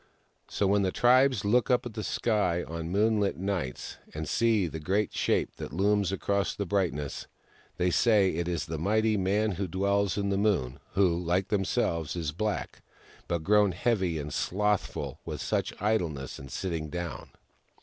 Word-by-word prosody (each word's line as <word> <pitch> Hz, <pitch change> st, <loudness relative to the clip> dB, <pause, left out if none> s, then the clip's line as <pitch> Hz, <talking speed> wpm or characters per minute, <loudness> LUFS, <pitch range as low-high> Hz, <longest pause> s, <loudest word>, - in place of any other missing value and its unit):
So, 100 Hz, -, -1 dB
when 100 Hz, +1 st, +3 dB
the 95 Hz, -1 st, +1 dB
tribes 125 Hz, -2 st, +4 dB
look 120 Hz, +4 st, +3 dB
up 125 Hz, -1 st, +3 dB
to 120 Hz, -, -5 dB
the 110 Hz, -1 st, -6 dB
sky 105 Hz, -8 st, 0 dB
on 85 Hz, +1 st, -5 dB
moonht 105 Hz, 0 st, +2 dB
nights 90 Hz, -9 st, -3 dB, 0.2 s
and 80 Hz, 0 st, -4 dB
see 115 Hz, -4 st, +2 dB
the 80 Hz, -1 st, -5 dB
great 95 Hz, +6 st, 0 dB
shape -, -, 0 dB
that -, -, -6 dB
looms 100 Hz, +3 st, +2 dB
across 100 Hz, +1 st, -1 dB
the 100 Hz, -, -2 dB
brightness, 85 Hz, -7 st, -2 dB, 0.5 s
they 90 Hz, 0 st, +1 dB
say 105 Hz, -2 st, +4 dB
it 85 Hz, +2 st, -2 dB
is 85 Hz, -2 st, -2 dB
the 80 Hz, -2 st, -4 dB
mighty 110 Hz, +5 st, +2 dB
Man 105 Hz, +3 st, +1 dB
Who 100 Hz, -1 st, -2 dB
D 90 Hz, -, -7 dB
wells 100 Hz, 0 st, +1 dB
in 100 Hz, -1 st, 0 dB
The 100 Hz, 0 st, +1 dB
Moon; 90 Hz, -13 st, 0 dB
who, 90 Hz, -3 st, +2 dB
Hke 90 Hz, +3 st, +1 dB
themselves, 85 Hz, -5 st, 0 dB
is 80 Hz, -4 st, -2 dB
black, 105 Hz, +6 st, -3 dB, 0.5 s
but 85 Hz, -2 st, -1 dB
grown 105 Hz, 0 st, +4 dB
heavy 95 Hz, -4 st, 0 dB
and 75 Hz, -1 st, -5 dB
slothful 105 Hz, +1 st, -1 dB
with -, -, -5 dB
much -, -, 0 dB
idleness 85 Hz, -10 st, -1 dB
and 65 Hz, 0 st, -10 dB
sitting 80 Hz, -5 st, -3 dB
down. 85 Hz, +1 st, -5 dB
95 Hz, 170 wpm, -28 LUFS, 85-105 Hz, 0.5 s, tribes